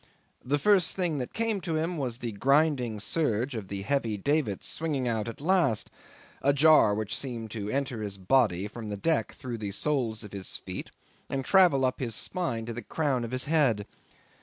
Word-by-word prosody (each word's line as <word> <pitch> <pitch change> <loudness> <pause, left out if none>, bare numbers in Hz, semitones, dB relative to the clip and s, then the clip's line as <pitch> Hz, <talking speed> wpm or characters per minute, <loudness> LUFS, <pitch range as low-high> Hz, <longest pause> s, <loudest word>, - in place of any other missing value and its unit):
The 140 +3 +1
first 185 +3 +3
thing 175 -6 0
that 125 - -4
came 225 -3 -1
to 165 -3 -2
him 165 +3 -1
was 130 -6 -3
the 120 -2 -4
grinding 135 -1 +2
surge 125 0 0
of 110 -5 -5
the 100 0 -4
heavy 115 -3 0
davits 140 -3 0
swinging 145 -6 -1
out 115 -2 -1
at 115 +5 -6
last 165 - +2 0.5
a 140 - +3
jar 145 -7 +6
which 105 -1 -3
seemed 115 -5 -5
to 105 -2 -4
enter 130 -2 -2
his 100 -2 -5
body 100 -2 +2
from 110 0 -7
the 105 - -3
deck 160 +9 0
through 125 -5 -6
the 105 -2 -3
soles 115 -1 -1
of 105 - -10
his 95 -2 -6
feet, - - -6 0.4
and 135 -1 -2
travel 175 -9 +5
up 130 - -1
his 115 -5 -3
spine 125 -11 -3
to 120 - -4
the 120 - -5
crown 135 +1 -1
of 115 - -4
his 130 +1 -1
head. 135 -10 +2
130 Hz, 195 wpm, -28 LUFS, 110-150 Hz, 0.5 s, jar